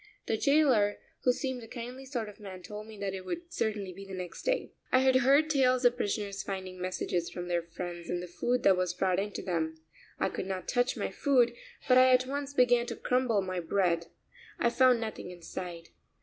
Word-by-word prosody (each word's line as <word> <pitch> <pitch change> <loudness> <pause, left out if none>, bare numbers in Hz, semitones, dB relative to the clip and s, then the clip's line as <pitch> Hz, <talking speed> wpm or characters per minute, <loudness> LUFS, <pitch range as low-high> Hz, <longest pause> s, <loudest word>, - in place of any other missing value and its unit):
The - - 0
jailer, 255 -6 +3 0.3
who 250 - +6
seemed 255 0 -3
a 225 - -10
kindly 250 +3 -7
sort 240 -5 -3
of 210 - -11
man, 190 -3 -9
told 210 +2 -8
me 220 -1 -11
that 200 -1 -3
it 190 -1 -5
would 345 - -6
certainly 205 - -2
be 195 +3 -9
the 195 -1 -7
next 180 -1 -6
day. - - -1 0.2
I - - +6
had 260 0 +5
heard 275 +4 +5
tales 255 -4 +3
of 245 0 +5
prisoners 205 -3 -2
finding 185 -2 -6
messages 180 -1 -2
from 175 0 -6
their 175 -1 +1
friends 170 0 -7
in 175 - -1
the 180 - -5
food 240 +8 -1
that 195 - +6
was 180 -1 -1
brought 185 -1 +1
in 205 +1 -2
to - - -5
them. 160 -3 -2 0.4
I - - +1
could 185 - -4
not 190 -1 -4
touch 245 0 +1
my - - -2
food, 250 -5 +3 0.3
but 255 0 +7
I 255 0 +7
at 255 0 +5
once 280 +1 -3
began 245 -2 +4
to - - -4
crumble 250 -5 +1
my 185 -1 -3
bread. 170 -1 +1 0.5
I 235 - +2
found 255 -1 +5
nothing 220 -5 -5
inside. 175 -1 -7
210 Hz, 215 wpm, -30 LUFS, 185-255 Hz, 0.5 s, but